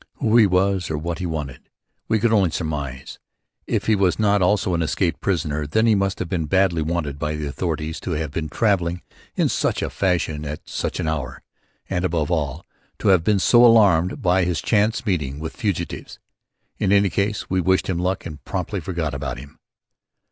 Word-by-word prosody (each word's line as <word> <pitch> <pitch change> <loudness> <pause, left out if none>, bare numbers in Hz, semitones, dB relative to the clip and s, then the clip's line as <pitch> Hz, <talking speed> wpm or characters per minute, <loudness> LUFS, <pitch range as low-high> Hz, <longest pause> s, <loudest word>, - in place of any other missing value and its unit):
Who 110 - +1
he 110 -3 +7
was 95 0 +1
or 80 - -2
what 85 +3 -4
he 90 - -2
wanted, 75 -6 -6 0.4
we 110 - +2
could 115 +1 +2
only 100 -5 +4
surmise. 70 -6 -5 0.5
If - - -1
he 110 - +3
was 95 -3 +2
not 105 -2 +2
also 95 0 +2
an 85 - 0
escaped 85 +3 -1
prisoner 75 -5 -1
then 110 +10 +2
he 115 - +5
must 100 -1 0
have - - -3
been 85 -3 -2
badly 95 -1 +2
wanted 75 -3 -2
by 75 0 -2
the 75 0 -4
authorities 80 +1 -3
to 90 - -4
have 80 -2 -3
been 80 0 -3
travelling 90 -3 0 0.3
in - - +2
such - - 0
a - - -3
fashion 85 -5 0
at 75 0 -7
such - - -3
an - - -2
hour; 70 -5 -3 0.4
and 90 -2 -2
above 85 -3 0
all, 75 -2 -2 0.3
to - - 0
have 95 -4 +5
been 105 +3 +3
so 120 +5 +5
alarmed 100 -7 +4
by 90 +1 +3
this 90 -2 0
chance 110 +1 +1
meeting 75 - -1
with 80 +1 -6
fugitives. 105 -7 -3 0.6
In 95 - +1
any 100 0 +5
event 100 +3 -1
we 95 0 0
wished 95 +1 +2
him 90 -3 -1
luck 90 +2 -1
and 75 -2 -8
promptly 95 +2 -3
forgot 85 -3 -3
all - - -3
about - - -4
him. 70 +4 -12
90 Hz, 200 wpm, -22 LUFS, 75-100 Hz, 0.6 s, he